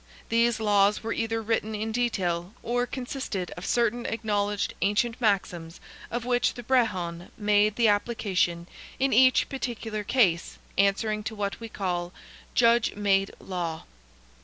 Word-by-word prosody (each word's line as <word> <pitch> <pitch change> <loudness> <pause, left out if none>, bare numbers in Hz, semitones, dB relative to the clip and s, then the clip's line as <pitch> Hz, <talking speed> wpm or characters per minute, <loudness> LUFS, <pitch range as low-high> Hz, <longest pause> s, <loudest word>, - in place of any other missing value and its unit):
These 230 0 +2
laws 205 -1 +3
were 225 - -2
either 225 0 -2
written 220 0 -1
in 220 +1 -3
detail, 190 -6 -1
or 245 +1 0
consisted 245 -8 -4
of 175 - -7
certain 240 0 +1
acknowledged 205 -2 -1
ancient 225 +4 +1
maxims 180 -6 0 0.3
of 240 0 -3
which 245 -1 +1
the 245 - -7
Brehon 185 -9 0
made 210 0 +3
the 235 -2 +3
application 200 -5 0 0.3
in 270 0 +1
each 255 +3 +5
particular 225 -5 -4
case, 200 -7 +2 0.2
answering 205 +2 +2
to 220 - -4
what 200 -1 -3
we 230 -1 -7
call 180 -3 -3 0.4
"Judge 235 -1 +4
made 195 -1 +2
law." 170 -4 -4
215 Hz, 135 wpm, -27 LUFS, 195-235 Hz, 0.4 s, each